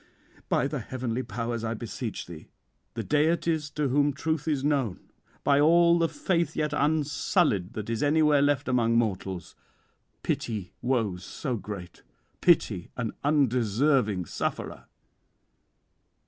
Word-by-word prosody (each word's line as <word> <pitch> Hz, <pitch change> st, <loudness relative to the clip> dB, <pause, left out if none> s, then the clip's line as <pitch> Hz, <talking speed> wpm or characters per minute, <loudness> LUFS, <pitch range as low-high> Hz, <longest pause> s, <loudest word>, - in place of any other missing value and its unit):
By -, -, +2 dB
the -, -, -3 dB
heavenly 130 Hz, -1 st, -3 dB
powers 115 Hz, 0 st, -4 dB
I 115 Hz, 0 st, -2 dB
beseech 115 Hz, +1 st, -5 dB
thee, 85 Hz, -3 st, -11 dB, 0.5 s
the -, -, -3 dB
deities 155 Hz, 0 st, +1 dB
to 150 Hz, -1 st, +1 dB
whom 145 Hz, +2 st, +2 dB
truth 160 Hz, +2 st, -2 dB
is 145 Hz, -4 st, 0 dB
known, 140 Hz, -9 st, -1 dB, 0.3 s
by 140 Hz, 0 st, +4 dB
all 170 Hz, +3 st, +5 dB
the 165 Hz, -1 st, +2 dB
faith 185 Hz, -, -1 dB
yet 150 Hz, -1 st, -1 dB
unsullied 145 Hz, -, +1 dB
that 110 Hz, -3 st, -5 dB
is 115 Hz, -1 st, -2 dB
anywhere 150 Hz, -1 st, +4 dB
left 145 Hz, -1 st, +1 dB
among 115 Hz, -2 st, +2 dB
mortals; 95 Hz, -6 st, -2 dB, 0.7 s
pity 105 Hz, -6 st, -3 dB
woes 110 Hz, -8 st, 0 dB
so 130 Hz, -, -4 dB
great; 100 Hz, -5 st, -8 dB, 0.4 s
pity 110 Hz, -, +3 dB
an 115 Hz, -3 st, -2 dB
undeserving 125 Hz, -, +2 dB
sufferer." -, -, -4 dB
130 Hz, 125 wpm, -27 LUFS, 110-150 Hz, 0.7 s, all